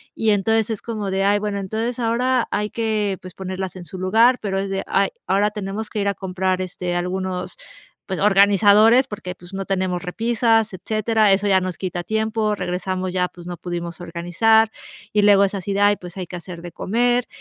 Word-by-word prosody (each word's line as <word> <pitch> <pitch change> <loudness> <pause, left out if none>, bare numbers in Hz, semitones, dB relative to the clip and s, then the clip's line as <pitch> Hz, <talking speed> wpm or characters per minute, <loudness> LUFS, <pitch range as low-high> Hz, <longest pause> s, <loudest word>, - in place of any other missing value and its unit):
Y 220 -1 +2
entonces 220 +2 +2
es 220 -3 -3
como 215 -4 -4
de: 190 0 0
"Ay, 205 +1 +3
bueno, 205 -1 -2
entonces 220 +5 -3
ahora 245 +2 +1
hay 210 +1 -1
que, 215 -4 -1
pues 185 -1 -10
ponerlas 190 0 -5
en 175 - -9
su 185 - -9
lugar", 225 +7 +4
pero 195 -2 -1
es 195 0 -3
de: 195 0 -2
"Ay, 195 0 +2 0.2
ahora 200 +2 +2
tenemos 210 +1 -5
que 215 - -4
ir 200 - 0
a - - 0
comprar, 185 -1 -2
este, 180 -1 -4
algunos, 180 - -3 0.5
pues 190 - -4
organizadores, 205 +5 +5
porque, 195 -5 -6
pues 175 +1 -14
no 195 - -3
tenemos 185 -1 -1
repisas", 225 +2 +1
etcétera. 215 +2 +1
Eso 200 +1 +1
ya 190 -1 +4
nos 185 -2 -4
quita 180 -1 -4
tiempo, 220 +2 0
regresamos 185 0 -3
ya, 180 -1 0
pues 175 -1 -13
no 175 - -5
pudimos 175 0 -5
organizar. 180 +7 +2 0.4
Y 210 - +3
luego 200 -1 +6
es 195 - -3
así 200 +1 -4
de: 200 - -1
"Ay, 205 0 +5
pues 180 0 -10
hay 185 -2 -5
que 180 - -8
hacer 175 -1 -8
de 175 -1 -9
comer 240 +4 +1
195 Hz, 205 wpm, -21 LUFS, 185-220 Hz, 0.5 s, luego